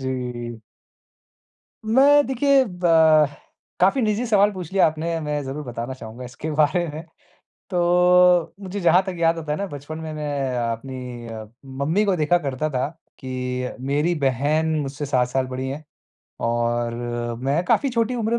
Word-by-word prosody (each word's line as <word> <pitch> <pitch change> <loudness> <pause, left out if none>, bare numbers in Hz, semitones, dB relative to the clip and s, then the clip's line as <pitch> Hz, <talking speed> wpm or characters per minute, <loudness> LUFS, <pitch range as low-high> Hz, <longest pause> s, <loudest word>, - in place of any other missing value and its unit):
जी। 125 -3 -4 1.2
मैं 275 +6 +5
देखिए 270 +1 +3
ब 160 -4 +4 0.5
काफ़ी 195 +9 +3
निजी 215 +1 0
सवाल 205 -2 +4
पूछ 185 -3 -7
लिया 195 - +5
आपने, 165 +1 -2
मैं 150 -1 -2
ज़रूर 140 +3 -5
बताना 120 0 -5
चाहूँगा 120 0 -9
इसके 130 +5 -6
बारे 155 +4 +2
में। 155 - -5 0.7
तो 180 -1 +4
मुझे 195 0 -5
जहाँ 175 0 +5
तक 190 -2 -5
याद 165 0 +3
आता 155 -2 -5
है 150 - -1
ना 200 - -2
बचपन 145 0 -8
में 160 -1 -6
मैं 145 -4 -2
अ, 120 -1 0
अपनी 125 0 -7
अ, 110 -1 -7 0.2
मम्मी 140 +9 0
को 195 -2 +2
देखा 170 +1 +2
करता 145 -1 -2
था 130 -2 -1 0.3
कि 125 -1 -3 0.2
मेरी 150 +5 +1
बहन 150 +5 +1
मुझसे 140 +1 -4
7 125 -3 +1
साल 130 +1 -1
बड़ी 130 +1 -4
हैं 145 +3 -6 0.6
और 120 0 0 0.5
मैं 140 +5 +1
काफ़ी 275 +9 +2
छोटी 235 0 0
उम्र 235 0 0
150 Hz, 160 wpm, -22 LUFS, 130-180 Hz, 1.2 s, मैं